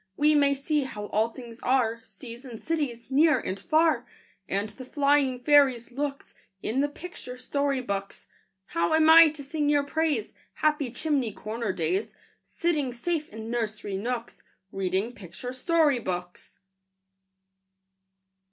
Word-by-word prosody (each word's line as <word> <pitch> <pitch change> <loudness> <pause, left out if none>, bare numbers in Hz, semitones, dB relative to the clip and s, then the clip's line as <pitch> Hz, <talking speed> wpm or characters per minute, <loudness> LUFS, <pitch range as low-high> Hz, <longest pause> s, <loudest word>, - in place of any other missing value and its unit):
We 300 +1 +4
may 280 -1 +4
see 290 +1 0
how 210 -5 -6
all 220 +2 +2
things 235 -1 -10
are, 230 -3 +1
Seas 230 +4 -11
and 240 -5 -9
cities, 285 -8 -2
near 295 0 +5
and 190 -2 -4
far, 315 -6 +2 0.4
And 200 +2 0
the 255 +5 -10
flying 280 -1 +2
fairies' 270 -5 +4
looks, 280 +2 -4 0.3
In 240 +5 -1
the 290 +1 +2
picture 290 -5 -9
story 280 +1 -1
books. 200 -4 -5 0.4
How 170 - +1
am 320 0 +6
I 330 0 +10
to 300 -1 -8
sing 295 +1 -1
your 290 -1 +3
praise, 285 -6 -1 0.2
Happy 300 -4 +1
chimney 265 -2 -1
corner 215 +1 -4
days, 180 +4 -2 0.3
Sitting 305 -6 -1
safe 305 +6 -2
in 220 +2 -7
nursery 215 -4 -3
nooks, 235 +4 -4 0.3
Reading 195 +4 -1
picture 200 +5 -8
story 300 0 +2
books? 180 -4 -6
255 Hz, 140 wpm, -27 LUFS, 225-295 Hz, 0.4 s, I